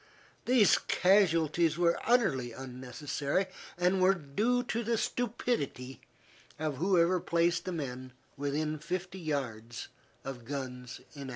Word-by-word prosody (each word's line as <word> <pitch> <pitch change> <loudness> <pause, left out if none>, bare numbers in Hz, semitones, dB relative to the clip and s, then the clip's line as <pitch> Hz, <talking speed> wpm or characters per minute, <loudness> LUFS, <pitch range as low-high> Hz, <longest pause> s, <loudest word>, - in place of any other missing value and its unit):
These 240 -5 +5
casualties 170 -4 +3
were 170 -1 +3
utterly 135 - +2
unnecessary 135 +6 -3 0.3
and 180 +2 +2
were 190 +1 +5
due 210 - 0
to 235 0 -2
the 230 +1 0
stupidity 210 - -2 0.6
of 150 -3 -2
whoever 180 +1 +3
placed 170 0 +1
the 185 - -2
men 130 -6 -5 0.2
within 150 +2 -2
fifty 185 +4 -4
yards 120 -8 -4 0.4
of 130 -3 -6
guns 125 -1 -6
in 140 - -9
action. 135 - -6
155 Hz, 120 wpm, -31 LUFS, 135-185 Hz, 0.6 s, These